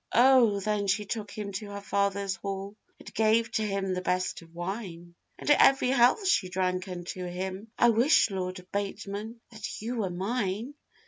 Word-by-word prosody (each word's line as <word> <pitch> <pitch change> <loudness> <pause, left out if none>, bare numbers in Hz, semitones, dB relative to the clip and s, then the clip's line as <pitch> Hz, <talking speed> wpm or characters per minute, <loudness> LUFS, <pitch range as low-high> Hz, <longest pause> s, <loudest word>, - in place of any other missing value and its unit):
O! 240 -4 +6
then 205 0 -1
she 210 +2 +1
took 210 0 -4
him 205 -1 -6
to 205 +1 -5
her 200 0 -6
father's 200 -1 -1
hall, 195 +1 -5 0.2
And - - -12
gave 225 +1 +2
to 220 - 0
him 195 -2 -1
the 180 - -2
best 185 0 -1
of 165 -1 -16
wine; 175 -2 -6 0.2
And - - -10
every 270 -3 +5
health 260 - +4
she 210 - +2
drank 185 0 -1
unto 180 0 -6
him, 185 +3 -5
'I 240 - +5
wish, 235 0 +4
Lord 185 -1 -4
Bateman, 205 +3 -4
that 220 -2 -6
you 235 +3 -4
were 205 -4 -1
mine! 205 +5 -2
200 Hz, 175 wpm, -28 LUFS, 185-225 Hz, 0.2 s, O